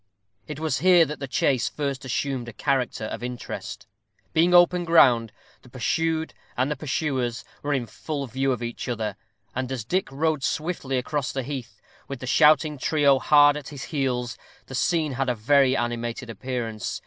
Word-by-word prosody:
It 150 Hz, -1 st, -6 dB
was 155 Hz, -5 st, -1 dB
here 175 Hz, 0 st, +6 dB
that 150 Hz, +1 st, -6 dB
the 135 Hz, -, -4 dB
chase 130 Hz, -1 st, +1 dB
first 140 Hz, -2 st, -3 dB
assumed 130 Hz, -1 st, -2 dB
a -, -, -10 dB
character 130 Hz, -2 st, -1 dB
of 110 Hz, -, -5 dB
interest. 115 Hz, -4 st, -6 dB, 0.5 s
Being 170 Hz, +2 st, +4 dB
open 175 Hz, 0 st, +5 dB
ground, 125 Hz, -10 st, +5 dB, 0.3 s
the 125 Hz, -, -17 dB
pursued 160 Hz, +6 st, -1 dB, 0.2 s
and 135 Hz, +4 st, +1 dB
pursuers 130 Hz, -5 st, -2 dB, 0.2 s
were 145 Hz, -, -2 dB
in 125 Hz, -3 st, -1 dB
full 145 Hz, +3 st, -5 dB
view 135 Hz, +2 st, -1 dB
of 120 Hz, -2 st, -2 dB
each 120 Hz, +1 st, -5 dB
other; 110 Hz, -4 st, -2 dB, 0.4 s
and 130 Hz, 0 st, -3 dB
as 125 Hz, -5 st, -4 dB
Dick 185 Hz, +5 st, -1 dB
rode 155 Hz, +1 st, 0 dB
swiftly 150 Hz, -3 st, -2 dB
across 135 Hz, +2 st, -2 dB
the 135 Hz, -, -3 dB
heath, 125 Hz, -6 st, -6 dB, 0.3 s
with 135 Hz, -2 st, -6 dB
the 130 Hz, -, -6 dB
shouting 150 Hz, +3 st, +4 dB
trio 140 Hz, -1 st, +3 dB
hard 145 Hz, 0 st, +6 dB
at 150 Hz, -2 st, -6 dB
his 140 Hz, -2 st, -7 dB
heels, 125 Hz, -4 st, -1 dB, 0.3 s
the -, -, -11 dB
scene 155 Hz, +3 st, +1 dB
had 130 Hz, 0 st, -1 dB
a 125 Hz, -, +1 dB
very 130 Hz, +4 st, +3 dB
animated 120 Hz, 0 st, -3 dB
appearance. 115 Hz, -2 st, -4 dB
135 Hz, 170 wpm, -25 LUFS, 120-150 Hz, 0.5 s, here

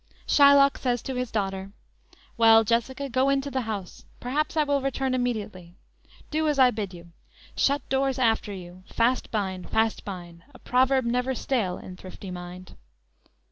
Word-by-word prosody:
Shylock 280 Hz, -1 st, +5 dB
says 245 Hz, -3 st, -1 dB
to 265 Hz, -, -4 dB
his 250 Hz, -1 st, -3 dB
daughter: 195 Hz, -2 st, -3 dB, 0.4 s
_"Well, 225 Hz, -1 st, +4 dB
Jessica, 240 Hz, +5 st, -1 dB
go 260 Hz, +1 st, +1 dB
in 275 Hz, 0 st, +3 dB
to 280 Hz, +1 st, -6 dB
the 260 Hz, 0 st, -1 dB
house, 200 Hz, -4 st, -6 dB, 0.2 s
Perhaps 300 Hz, +6 st, -2 dB
I 305 Hz, -, +4 dB
will 285 Hz, -1 st, 0 dB
return 270 Hz, -1 st, -1 dB
immediately; 210 Hz, -8 st, -3 dB, 0.6 s
Do 310 Hz, +1 st, 0 dB
as 295 Hz, -2 st, +1 dB
I 255 Hz, -2 st, +6 dB
bid 210 Hz, -4 st, -4 dB
you; 170 Hz, -1 st, -13 dB, 0.4 s
Shut 280 Hz, +1 st, +1 dB
doors 270 Hz, 0 st, 0 dB
after 225 Hz, -4 st, +1 dB
you; 180 Hz, -1 st, -10 dB
fast 245 Hz, +3 st, +1 dB
bind, 190 Hz, -4 st, -3 dB
fast 220 Hz, 0 st, +1 dB
find, 175 Hz, -3 st, -8 dB
A -, -, -10 dB
proverb 260 Hz, +1 st, +2 dB
never 250 Hz, +2 st, 0 dB
stale 220 Hz, -9 st, -1 dB
in 180 Hz, 0 st, -10 dB
thrifty 185 Hz, +1 st, -9 dB
mind." 180 Hz, +1 st, -9 dB
235 Hz, 165 wpm, -26 LUFS, 195-265 Hz, 0.6 s, I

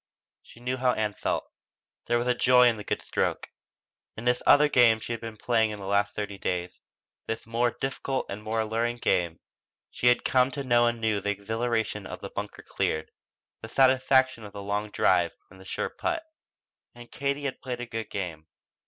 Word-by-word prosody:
She -, -, -17 dB
knew 125 Hz, +2 st, -2 dB
how 125 Hz, -1 st, +2 dB
Ann 105 Hz, -1 st, -1 dB
felt. -, -, -2 dB, 0.6 s
There 120 Hz, -, +3 dB
was 125 Hz, +1 st, +1 dB
joy 125 Hz, 0 st, +6 dB
in 115 Hz, -2 st, +2 dB
the 105 Hz, -, -7 dB
good -, -, -3 dB
stroke. -, -, -1 dB, 0.7 s
In 110 Hz, -, -6 dB
this 125 Hz, 0 st, +2 dB
other 150 Hz, +1 st, +7 dB
game 120 Hz, -5 st, +5 dB
she 120 Hz, -, -4 dB
had 115 Hz, -, -5 dB
been 115 Hz, -2 st, -7 dB
playing 110 Hz, 0 st, +2 dB
in 105 Hz, -, -5 dB
the 100 Hz, -, -8 dB
last 100 Hz, +1 st, +1 dB
thirty 100 Hz, -2 st, -4 dB
days 90 Hz, -1 st, -3 dB, 0.5 s
this 115 Hz, -, -4 dB
more 115 Hz, +2 st, +1 dB
difficult 135 Hz, 0 st, -2 dB
and 100 Hz, +2 st, -6 dB
more 110 Hz, +1 st, -1 dB
alluring 115 Hz, +2 st, -1 dB
game 85 Hz, -7 st, 0 dB, 0.5 s
she 125 Hz, -, 0 dB
had 120 Hz, 0 st, +4 dB
come 130 Hz, -1 st, +4 dB
to 140 Hz, -, -3 dB
know 120 Hz, -2 st, +4 dB
anew 110 Hz, -3 st, 0 dB
the 100 Hz, -, -2 dB
exhilaration 110 Hz, 0 st, -2 dB
of -, -, -8 dB
bunker -, -, -6 dB
cleared, 80 Hz, 0 st, -2 dB, 0.5 s
the 110 Hz, -, -8 dB
satisfaction 130 Hz, -1 st, +3 dB
of 100 Hz, -1 st, -10 dB
the 100 Hz, -, -7 dB
long 105 Hz, +1 st, -2 dB
drive 85 Hz, -4 st, +2 dB, 0.2 s
and 95 Hz, -, -15 dB
the -, -, -14 dB
sure -, -, -3 dB
putt. 340 Hz, -1 st, -2 dB, 0.7 s
And 120 Hz, 0 st, -13 dB
Katie 140 Hz, +1 st, -2 dB
had 135 Hz, -, -4 dB
played 125 Hz, -2 st, -4 dB
a 120 Hz, -, -4 dB
good 115 Hz, -2 st, -5 dB
game. 80 Hz, -5 st, -5 dB
115 Hz, 190 wpm, -27 LUFS, 105-125 Hz, 0.7 s, other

